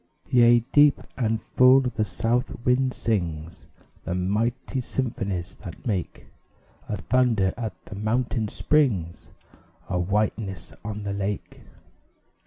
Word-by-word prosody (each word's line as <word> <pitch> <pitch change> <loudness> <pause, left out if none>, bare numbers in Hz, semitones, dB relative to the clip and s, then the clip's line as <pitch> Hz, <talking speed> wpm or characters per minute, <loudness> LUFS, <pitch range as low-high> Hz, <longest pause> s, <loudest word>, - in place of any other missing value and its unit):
Yea, 120 -1 +6
deep 145 -1 +6 0.2
and 115 -3 0
full 130 +4 +5
the 125 -4 -1
South 120 +2 -2
Wind 130 +1 +3
sings 85 -9 -3 0.4
The 90 - -3
mighty 110 +8 -1
symphonies 100 -8 -3
that 90 -5 -9
make 100 -7 -3 0.6
A 105 - -1
thunder 110 -2 +2
at 110 -6 -5
the - - -10
mountain 110 +2 -1
springs 105 - 0 0.6
A 90 -2 0
whiteness 100 -1 -2
on 105 0 -5
the 100 -1 -3
lake. 100 0 -4
110 Hz, 115 wpm, -25 LUFS, 95-125 Hz, 0.6 s, Yea